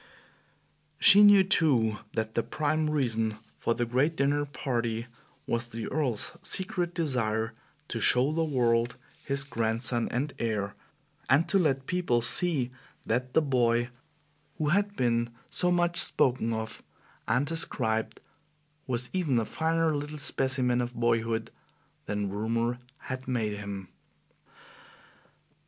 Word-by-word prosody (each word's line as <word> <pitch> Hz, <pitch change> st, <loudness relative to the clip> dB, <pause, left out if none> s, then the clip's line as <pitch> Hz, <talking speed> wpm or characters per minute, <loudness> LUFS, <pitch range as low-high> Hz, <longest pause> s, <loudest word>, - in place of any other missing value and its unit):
She 200 Hz, +5 st, +8 dB
knew, 205 Hz, -2 st, +8 dB
too, 135 Hz, -, +2 dB, 0.2 s
that 110 Hz, 0 st, -2 dB
the 115 Hz, -, +1 dB
prime 155 Hz, +4 st, -1 dB
reason 115 Hz, -7 st, 0 dB, 0.2 s
for 115 Hz, -, -1 dB
the 120 Hz, -, 0 dB
great 130 Hz, +7 st, +1 dB
dinner 145 Hz, +1 st, +1 dB
party 120 Hz, -5 st, -2 dB, 0.4 s
was 115 Hz, +1 st, -1 dB
the 115 Hz, -1 st, -5 dB
Earl's 130 Hz, -7 st, -1 dB
secret 180 Hz, -2 st, -1 dB
desire 115 Hz, -8 st, -1 dB, 0.4 s
to 115 Hz, -, -3 dB
show 125 Hz, +5 st, +3 dB
the 165 Hz, +1 st, 0 dB
world 120 Hz, -5 st, +1 dB, 0.3 s
his 140 Hz, 0 st, 0 dB
grandson 115 Hz, -2 st, +1 dB
and 135 Hz, +4 st, -2 dB
heir, 105 Hz, -3 st, -2 dB, 0.6 s
and 140 Hz, +6 st, +4 dB
to 195 Hz, -, +3 dB
let 135 Hz, -6 st, +1 dB
people 170 Hz, -10 st, 0 dB
see 140 Hz, -4 st, +2 dB, 0.3 s
that 125 Hz, +3 st, -1 dB
the 160 Hz, -, +5 dB
boy 120 Hz, -3 st, +1 dB, 0.7 s
who 150 Hz, -1 st, 0 dB
had 200 Hz, +4 st, +1 dB
been 120 Hz, -3 st, +1 dB, 0.2 s
so 180 Hz, -, +1 dB
much 175 Hz, -1 st, +2 dB
spoken 120 Hz, -3 st, +2 dB
of 110 Hz, 0 st, -4 dB, 0.5 s
and 130 Hz, +3 st, +2 dB
described 115 Hz, -8 st, 0 dB, 0.7 s
was 125 Hz, -1 st, -2 dB
even 165 Hz, -9 st, +1 dB
a 115 Hz, -, +1 dB
finer 160 Hz, +2 st, 0 dB
little 145 Hz, +1 st, -4 dB
specimen 130 Hz, -4 st, +1 dB
of 120 Hz, 0 st, -4 dB
boyhood 115 Hz, -1 st, 0 dB, 0.6 s
than 105 Hz, -1 st, -2 dB
rumor 115 Hz, +4 st, -1 dB, 0.2 s
had 130 Hz, -1 st, -6 dB
made 110 Hz, -5 st, -1 dB
him. 100 Hz, -2 st, -6 dB
125 Hz, 130 wpm, -28 LUFS, 115-150 Hz, 0.7 s, She